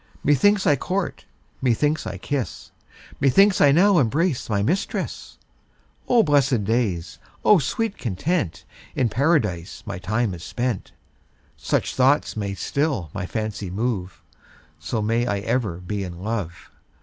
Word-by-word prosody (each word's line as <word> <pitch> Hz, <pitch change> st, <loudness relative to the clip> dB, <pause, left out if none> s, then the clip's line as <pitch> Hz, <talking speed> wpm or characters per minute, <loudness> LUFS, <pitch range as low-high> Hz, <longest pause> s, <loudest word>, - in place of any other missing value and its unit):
Methinks 190 Hz, +9 st, +3 dB
I 145 Hz, -, +5 dB
court, 185 Hz, +7 st, -3 dB, 0.4 s
methinks 145 Hz, +5 st, +1 dB
I -, -, -5 dB
kiss, 140 Hz, -5 st, -4 dB, 0.5 s
Methinks 190 Hz, +9 st, +4 dB
I 140 Hz, -, +7 dB
now 185 Hz, +4 st, +5 dB
embrace 145 Hz, +3 st, 0 dB
my 100 Hz, -2 st, +1 dB
mistress. 175 Hz, -, -2 dB, 0.7 s
O 240 Hz, -2 st, +5 dB
blessed 140 Hz, -, +2 dB
days, 100 Hz, -6 st, -1 dB, 0.3 s
O 210 Hz, -, +7 dB
sweet 215 Hz, -, -2 dB
content, 110 Hz, -, -2 dB, 0.3 s
In 125 Hz, -3 st, +1 dB
Paradise 110 Hz, -, 0 dB
my -, -, -5 dB
time 110 Hz, +3 st, -1 dB
is 85 Hz, -1 st, -8 dB
spent. 120 Hz, -2 st, -3 dB, 0.6 s
Such -, -, -1 dB
thoughts 135 Hz, +3 st, +2 dB
may 100 Hz, -2 st, -3 dB
still 140 Hz, -, -1 dB
my 100 Hz, -3 st, -4 dB
fancy 110 Hz, -3 st, -4 dB
move, 95 Hz, -5 st, -3 dB, 0.6 s
So 105 Hz, +8 st, -2 dB
may 115 Hz, +3 st, +1 dB
I 105 Hz, -, 0 dB
ever 110 Hz, -5 st, -1 dB
be 100 Hz, +3 st, -4 dB
in 90 Hz, -2 st, -7 dB
love. 100 Hz, -7 st, -4 dB
120 Hz, 135 wpm, -23 LUFS, 100-145 Hz, 0.7 s, I